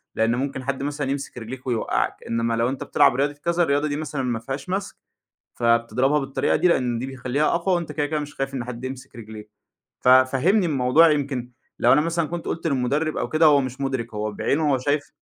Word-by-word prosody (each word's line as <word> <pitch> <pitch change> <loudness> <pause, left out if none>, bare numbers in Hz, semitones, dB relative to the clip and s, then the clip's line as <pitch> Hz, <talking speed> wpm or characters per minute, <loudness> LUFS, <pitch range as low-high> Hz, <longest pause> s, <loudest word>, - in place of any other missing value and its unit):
لإن 115 +1 +2
ممكن 130 +1 -3
حد 135 0 -3
مثلًا 145 -1 -3
يمسك 140 -2 -5
رجليك 125 +3 -8
ويوقّعك، 120 -3 -1
إنّما 115 0 0
لو 115 +1 +1
أنت 135 0 -4
بتلعب 145 -4 +3
رياضة،" 140 +2 0
كذا 170 +4 0
"الرياضة 145 -1 +1
دي 145 - -2
مثلًا 150 -2 -4
ما 120 -3 -1
فيهاش 135 +8 -6
مَسك، 195 +2 -3 0.6
فبتضربها 115 +4 +2
بالطريقة 135 -1 0
دي 180 - +3
لإن 125 -7 +1
دي 125 - -4
بيخلّيها 135 +2 -1
أقوى 180 +2 +1
وأنت 170 -2 -4
كده، 145 -2 -1
كده 150 +1 -2
مش 145 0 -7
خايف 135 0 -3
إن 125 -3 -3
حد 120 0 -7
يمسك 130 -2 -8
رجليك." 110 -2 -10 0.5
ففهّمني 130 +10 +4
الموضوع 150 +2 +4
يمكن 135 -4 -2 0.3
لو - - +5
أنا 150 - +5
مثلًا 165 0 -1
كنت 170 +1 -5
قُلت 165 - -3
للمُدرّب 145 +3 0
أو - - -2
كده 155 +1 +4
هو 145 -2 +6
مش 130 +1 -6
مُدرِك، 130 -4 -3
هو 105 0 -3
بعينه 145 +8 0
هو 130 - +2
شايف 145 +3 -1
135 Hz, 210 wpm, -23 LUFS, 125-150 Hz, 0.6 s, هو